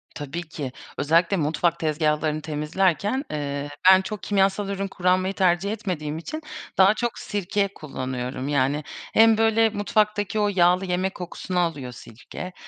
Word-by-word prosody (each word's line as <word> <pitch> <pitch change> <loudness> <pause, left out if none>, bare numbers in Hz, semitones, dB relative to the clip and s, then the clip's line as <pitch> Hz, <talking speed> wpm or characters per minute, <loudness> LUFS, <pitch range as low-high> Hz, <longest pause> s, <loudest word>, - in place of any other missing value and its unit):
Tabii 145 +4 -5
ki. 140 -5 -5 0.3
Özellikle 170 +6 +2
mutfak 165 +2 0
tezgahlarını 155 0 0
temizlerken, 175 - 0
ııı, 145 -1 -3 0.2
ben 190 0 +8
çok 190 -2 -6
kimyasal 195 +1 +1
ürün 195 0 -2
kullanmayı 185 +1 +1
tercih 185 +1 +2
etmediğim 175 -9 -3
için 310 - -6 0.4
daha 195 +2 +6
çok 235 +2 -3
sirke 200 0 -1
kullanıyorum. 130 -2 -5
Yani, 145 +1 +1 0.3
hem 225 0 +6
böyle 225 0 +4
mutfaktaki 210 0 0
o 210 - +3
yağlı 180 +1 +4
yemek 185 +1 -1
kokusunu 180 0 -4
alıyor 145 -7 -1
sirke, 125 +10 -9
180 Hz, 135 wpm, -24 LUFS, 150-200 Hz, 0.4 s, ben